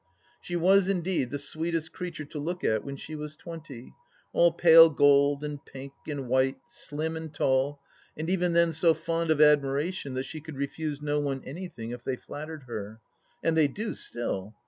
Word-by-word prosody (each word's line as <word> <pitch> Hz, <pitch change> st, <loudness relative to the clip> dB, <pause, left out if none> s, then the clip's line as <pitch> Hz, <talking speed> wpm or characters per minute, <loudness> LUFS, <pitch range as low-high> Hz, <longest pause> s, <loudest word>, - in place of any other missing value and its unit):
She 175 Hz, -, -5 dB
was 190 Hz, +3 st, +4 dB
indeed 180 Hz, -8 st, 0 dB
the 145 Hz, -, -3 dB
sweetest 160 Hz, +2 st, -3 dB
creature 175 Hz, -4 st, -6 dB
to 150 Hz, +1 st, -7 dB
look 175 Hz, +5 st, -4 dB
at 110 Hz, -1 st, +1 dB
when 140 Hz, 0 st, -6 dB
she 155 Hz, +3 st, -9 dB
was 150 Hz, 0 st, -6 dB
twenty, 160 Hz, -7 st, -10 dB, 0.4 s
all 170 Hz, 0 st, +5 dB
pale 165 Hz, -1 st, +8 dB
gold 145 Hz, 0 st, +4 dB
and 150 Hz, -1 st, -5 dB
pink 135 Hz, +1 st, -10 dB
and 145 Hz, -4 st, -4 dB
white, 130 Hz, +2 st, +2 dB
slim 160 Hz, -9 st, -4 dB
and 160 Hz, -1 st, -6 dB
tall, 140 Hz, 0 st, +1 dB, 0.4 s
and 155 Hz, +1 st, -3 dB
even 180 Hz, -1 st, +1 dB
then 170 Hz, -1 st, +4 dB
so 165 Hz, +1 st, +3 dB
fond 165 Hz, 0 st, -2 dB
of 155 Hz, -2 st, +3 dB
admiration 145 Hz, +1 st, +3 dB
that 130 Hz, +1 st, -2 dB
she 155 Hz, -, -7 dB
could 155 Hz, -2 st, -9 dB
refuse 145 Hz, +1 st, -3 dB
no 150 Hz, 0 st, 0 dB
one 140 Hz, -2 st, -2 dB
anything 145 Hz, -7 st, -7 dB
if 120 Hz, 0 st, -7 dB
they 130 Hz, -, -1 dB
flattered 155 Hz, +3 st, -8 dB
her. 110 Hz, -3 st, -7 dB, 0.4 s
And 165 Hz, -, +2 dB
they 155 Hz, -2 st, +5 dB
do 210 Hz, +10 st, -4 dB
still. 105 Hz, -3 st, -5 dB
150 Hz, 185 wpm, -28 LUFS, 140-165 Hz, 0.4 s, pale